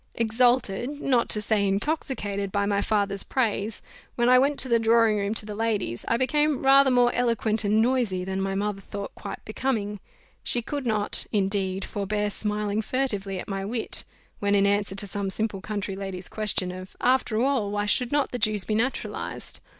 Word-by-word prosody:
Exalted, 235 Hz, -1 st, +2 dB
not 250 Hz, -5 st, +1 dB
to 210 Hz, -, +5 dB
say 205 Hz, -1 st, +2 dB
intoxicated, 200 Hz, -3 st, -2 dB
by 200 Hz, +1 st, +1 dB
my 200 Hz, 0 st, +1 dB
father's 200 Hz, -2 st, +1 dB
praise, 220 Hz, -4 st, -1 dB, 0.3 s
when 240 Hz, 0 st, +2 dB
I 255 Hz, 0 st, +7 dB
went 280 Hz, +2 st, +2 dB
to -, -, -1 dB
the 235 Hz, -2 st, +3 dB
drawing 225 Hz, -1 st, +4 dB
room 200 Hz, +2 st, -1 dB
to 215 Hz, -, -3 dB
the 210 Hz, -, -6 dB
ladies, 205 Hz, -, -2 dB
I 230 Hz, -, +2 dB
became 295 Hz, +2 st, +1 dB
rather 275 Hz, 0 st, +7 dB
more 245 Hz, -1 st, +4 dB
eloquent 230 Hz, -2 st, 0 dB
and 210 Hz, +2 st, +3 dB
noisy 235 Hz, -7 st, +1 dB
than 190 Hz, 0 st, -2 dB
my 195 Hz, 0 st, -1 dB
mother 200 Hz, 0 st, -2 dB
thought 200 Hz, +1 st, -7 dB
quite -, -, -8 dB
becoming; 215 Hz, -3 st, -2 dB, 0.4 s
she 240 Hz, -, +1 dB
could 280 Hz, 0 st, -4 dB
not, 210 Hz, -2 st, +1 dB
indeed, 195 Hz, -1 st, 0 dB
forbear 205 Hz, +1 st, -2 dB
smiling 210 Hz, 0 st, -1 dB
furtively 205 Hz, -6 st, -1 dB
at -, -, -6 dB
my 195 Hz, -1 st, -3 dB
wit, 225 Hz, +3 st, -3 dB, 0.4 s
when, 205 Hz, 0 st, +2 dB
in 200 Hz, 0 st, +4 dB
answer 200 Hz, -1 st, +1 dB
to 200 Hz, -, -2 dB
some 200 Hz, 0 st, -2 dB
simple 210 Hz, 0 st, -2 dB
country 205 Hz, -2 st, -4 dB
lady's 195 Hz, -2 st, -5 dB
question 205 Hz, -4 st, -1 dB
of 185 Hz, +1 st, -9 dB
"After 250 Hz, -3 st, +2 dB
all, 255 Hz, -5 st, +1 dB
why 205 Hz, 0 st, -1 dB
should 245 Hz, +3 st, +1 dB
not 290 Hz, -1 st, +1 dB
the 245 Hz, -, -3 dB
Jews 215 Hz, -3 st, +2 dB
be 215 Hz, -, -1 dB
naturalized?" 245 Hz, +5 st, -3 dB
210 Hz, 185 wpm, -26 LUFS, 200-240 Hz, 0.4 s, I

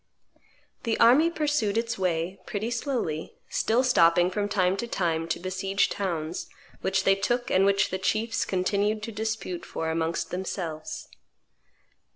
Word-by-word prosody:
The 230 Hz, -2 st, -1 dB
army 260 Hz, +8 st, +6 dB
pursued 295 Hz, -10 st, 0 dB
its 230 Hz, 0 st, 0 dB
way, 180 Hz, 0 st, -1 dB
pretty 215 Hz, +3 st, -3 dB
slowly, 230 Hz, -, -2 dB
still 235 Hz, +3 st, +2 dB
stopping 175 Hz, -7 st, +4 dB
from 205 Hz, +1 st, -1 dB
time 185 Hz, -2 st, +2 dB
to 235 Hz, -, -3 dB
time 165 Hz, -6 st, -1 dB
to -, -, -2 dB
besiege 190 Hz, +2 st, 0 dB
towns, 170 Hz, -4 st, -3 dB, 0.3 s
which 190 Hz, 0 st, +1 dB
they 195 Hz, -, +5 dB
took 240 Hz, +5 st, -1 dB
and 190 Hz, +1 st, +4 dB
which 195 Hz, -1 st, +2 dB
the 185 Hz, -, -2 dB
chiefs 220 Hz, +4 st, 0 dB
continued 200 Hz, +3 st, 0 dB
to 230 Hz, -, -4 dB
dispute 215 Hz, -5 st, -3 dB
for 160 Hz, -1 st, -3 dB
amongst 165 Hz, +1 st, -1 dB
themselves. 175 Hz, -4 st, -4 dB
195 Hz, 145 wpm, -27 LUFS, 175-225 Hz, 0.3 s, army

